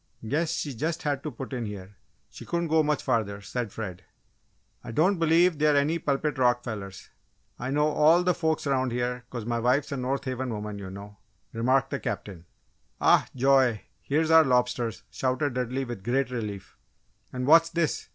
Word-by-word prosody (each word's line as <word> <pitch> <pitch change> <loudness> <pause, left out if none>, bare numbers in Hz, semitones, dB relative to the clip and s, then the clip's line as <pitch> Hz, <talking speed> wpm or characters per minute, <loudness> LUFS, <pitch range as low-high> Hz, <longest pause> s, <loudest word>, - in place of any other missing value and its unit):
"Guess 155 +6 0
she 145 - -3
just 160 +8 -3
had 145 -3 -1
to 155 - -4
put 135 +1 -8
in 120 -3 -3
here 100 -1 -9 0.3
she - - -12
couldn't 170 -1 -2
go 160 0 +4
much 150 -1 0
further," 110 -6 0
said 115 +2 -4
Fred. 95 -5 -6 0.8
"I - - -7
don't 175 - +2
believe 165 0 +3
they're 150 -1 +4
any 155 +4 +1
Pulpit 145 -1 -1
Rock 120 -1 +3
fellers 100 -4 -7 0.5
I 125 - -3
know 150 +2 +2
all 155 +3 +4
the 180 0 +3
folks 160 -3 -1
'round 130 -2 +1
here 125 0 -2
'cause 120 -4 -6
my 120 0 -1
wife's 130 +5 +1
a 140 - -2
North 130 +2 -2
Haven 130 0 -3
woman, 105 -2 -5
you 95 -2 -7
know," 100 +1 -10 0.4
remarked 130 +3 +1
the - - -2
Captain. 85 -5 -6 0.5
"Oh, - - +5
joy! 130 -4 +3 0.2
Here's 155 +3 0
our 160 0 +8
lobsters!" 125 -3 0
shouted 130 +1 -1
Dudley, 125 +2 -2
with 120 -6 -7
great 130 +3 0
relief. 105 -5 -6 0.5
"And 125 0 -3
what's 165 +3 +6
this?" 165 -3 -1
130 Hz, 180 wpm, -27 LUFS, 115-150 Hz, 0.8 s, our